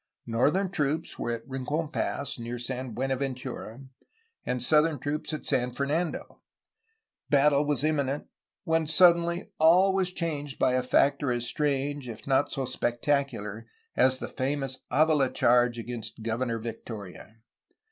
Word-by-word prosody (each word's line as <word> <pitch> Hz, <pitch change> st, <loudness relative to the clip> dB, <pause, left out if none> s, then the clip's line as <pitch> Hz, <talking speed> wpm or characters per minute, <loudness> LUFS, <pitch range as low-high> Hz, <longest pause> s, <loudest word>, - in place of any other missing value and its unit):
Northern 150 Hz, +12 st, +1 dB
troops 155 Hz, -2 st, -1 dB
were -, -, -2 dB
at 115 Hz, -1 st, -4 dB
Rincon 145 Hz, +4 st, -2 dB
Pass, 140 Hz, -4 st, -3 dB
near 120 Hz, +1 st, -5 dB
San 125 Hz, +1 st, -4 dB
Buenaventura, 130 Hz, -2 st, -3 dB, 0.6 s
and 125 Hz, -, -2 dB
southern 150 Hz, +4 st, +3 dB, 0.3 s
at 155 Hz, -, -5 dB
San 125 Hz, -3 st, 0 dB
Fernando. 155 Hz, +5 st, -2 dB, 0.9 s
Battle 145 Hz, 0 st, +4 dB
was 145 Hz, -3 st, 0 dB
imminent, 145 Hz, -2 st, 0 dB, 0.2 s
— -, -, -41 dB
^when 160 Hz, -1 st, +1 dB
suddenly 170 Hz, +3 st, +4 dB
all 180 Hz, +5 st, +6 dB
was 190 Hz, -2 st, +1 dB
changed 150 Hz, -6 st, -4 dB
by^ 130 Hz, -, +3 dB
a 130 Hz, -, +2 dB
factor 140 Hz, +2 st, +2 dB
as 120 Hz, 0 st, -1 dB
strange, 145 Hz, -1 st, -1 dB
if 110 Hz, -1 st, -9 dB
not 140 Hz, +1 st, +2 dB
so 135 Hz, -, -2 dB
spectacular, 120 Hz, -3 st, -1 dB, 0.3 s
as 130 Hz, +1 st, +4 dB
the -, -, -5 dB
famous 135 Hz, 0 st, -3 dB
Avila 150 Hz, -3 st, +3 dB
charge 120 Hz, 0 st, +3 dB
against 115 Hz, -1 st, -6 dB
Governor 115 Hz, +1 st, -1 dB
Victoria. 110 Hz, -3 st, -8 dB
135 Hz, 135 wpm, -28 LUFS, 120-150 Hz, 0.9 s, all